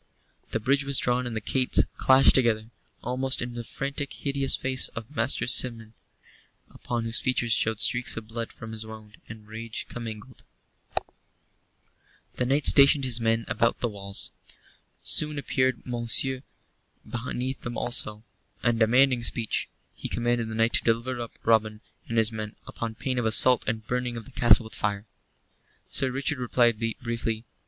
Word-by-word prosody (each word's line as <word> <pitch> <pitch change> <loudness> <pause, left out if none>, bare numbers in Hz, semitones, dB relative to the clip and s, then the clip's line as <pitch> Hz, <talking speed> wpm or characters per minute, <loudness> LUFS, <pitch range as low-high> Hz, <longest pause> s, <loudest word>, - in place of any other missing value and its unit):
The 115 - -2
bridge 140 +5 +1
was 140 -1 +2
drawn 125 0 +1
and 115 - -5
the - - -1
gates 130 +4 +3
clashed 130 +1 +5
together, 115 -3 +1 0.3
almost 130 +2 -1
in 125 0 -4
the 120 0 -6
frantic, 140 +4 -4
hideous 140 -1 +1
face 130 0 +1
of 115 +5 -7
Master 120 +1 +1
Simeon, 115 -3 0 0.8
upon 120 -1 -4
whose 115 +1 -1
features 120 -2 +1
showed 110 -1 +1
streaks 120 -2 +2
of 110 -1 -7
blood 115 0 -5
from 110 0 -10
his 110 0 -6
wound 110 -1 -12
and 110 -1 -11
rage 110 +1 -6
commingled. 115 +1 -8 1.9
The 125 - 0
knight 140 +2 +1
stationed 140 0 +8
his 125 -2 +1
men 115 0 +1
about 115 - +1
the 120 - 0
walls. 100 -1 -4 0.7
Soon 150 -1 +2
appeared 130 -2 0
Monceux 125 +2 +1 0.7
beneath 125 +2 -4
them 120 0 -6
alone, 110 -3 0 0.4
and 120 -1 +1
demanding 125 +2 +3
speech. 115 -1 0 0.2
He - - -7
commanded 120 -1 -1
the 110 - -5
knight 115 +1 +1
to - - +3
deliver 120 +2 0
up 115 - -8
Robin 110 -1 +2 0.3
and 115 - -3
his 110 0 +3
men 110 -1 -6
upon 115 -1 -6
pain 125 +2 -2
of 115 - 0
assault 125 +3 +4
and 110 -1 -2
burning 125 0 -2
of 115 - -8
the 135 - -13
castle 120 -2 +5
with 110 -2 -11
fire. 100 0 -2 0.9
Sir 130 - +1
Richard 135 +2 -2
replied 120 -2 +2 0.2
briefly. 115 -1 -3
120 Hz, 160 wpm, -26 LUFS, 110-130 Hz, 1.9 s, stationed